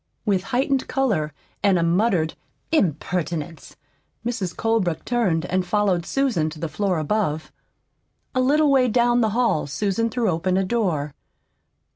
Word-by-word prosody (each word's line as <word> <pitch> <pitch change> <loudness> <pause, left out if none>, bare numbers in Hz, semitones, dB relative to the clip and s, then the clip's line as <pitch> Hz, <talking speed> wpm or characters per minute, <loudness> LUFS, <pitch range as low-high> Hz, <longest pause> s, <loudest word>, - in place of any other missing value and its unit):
With 195 -3 +1
heightened 265 +3 0
color 205 - 0 0.3
and 200 -3 +3
a 170 - +1
muttered 170 -2 +2 0.4
"Impertinence!" 170 - -1 0.5
Mrs. 225 -7 -2
Colebrook 220 -8 0
turned 205 -10 +1
and 185 +1 0
followed 185 -2 0
Susan 245 - +1
to 155 0 -10
the 165 - -2
floor 190 +2 -1
above. 155 -1 -1 0.8
A 255 - +2
little 290 +3 +3
way 260 -2 +4
down 240 +1 +3
the 220 - +2
hall 230 -13 +1
Susan 200 +9 -1
threw 230 0 -1
open 180 +3 0
a 195 - +2
door. 180 -9 -1
195 Hz, 140 wpm, -23 LUFS, 165-240 Hz, 0.8 s, way